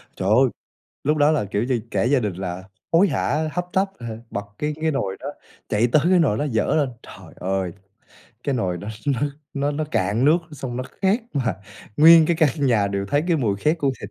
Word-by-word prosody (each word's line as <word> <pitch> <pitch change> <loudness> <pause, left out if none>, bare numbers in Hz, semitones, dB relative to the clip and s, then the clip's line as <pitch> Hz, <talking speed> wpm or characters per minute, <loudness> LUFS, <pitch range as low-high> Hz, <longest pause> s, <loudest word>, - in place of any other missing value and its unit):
Trời 95 - -2
ơi, 120 +6 +6 0.6
lúc 150 +2 +2
đó 145 0 +4
là, 150 -8 +1
kiểu 100 +2 -1
như, 125 -2 0
cả - - 0
gia 130 +2 +3
đình 105 -5 -2
là 90 0 -5 0.3
hối 175 +5 +5
hả, 155 +1 0
hấp 180 +1 -2
tấp, 195 +1 +1
ờ, 115 -2 -6
bật 100 - -4
cái 150 0 -2
cái 160 0 +1
nồi 100 -10 -2
đó, - - -7 0.4
chạy 110 +2 +2
tới 150 - +5
cái 185 - +5
nồi 135 -11 +2
đó 150 - 0
dỡ 110 - +1
lên. 145 -3 +2
Trời - - -13
ơi, 95 -1 -2 0.7
cái 140 - -1
nồi 95 -8 -1
đó 100 +5 -7 0.2
nó 140 -4 +1 0.3
nó 140 +1 0
nó 150 +1 -2
cạn 110 -4 0
nước, 155 +4 +5
xong 130 -4 -5
nó 130 - -2 0.2
khét 195 +5 +3
mà 130 -4 0 0.4
nguyên 160 +1 +8
cái 170 - +1
căn 155 -1 +4 0.2
nhà 110 -5 +3
đều 100 0 -2
thấy 145 +8 +1
cái 170 - +3
mùi 110 -9 0
khét 155 - +1
của 140 -3 +1
thịt 100 - -7
135 Hz, 225 wpm, -22 LUFS, 105-155 Hz, 0.7 s, nguyên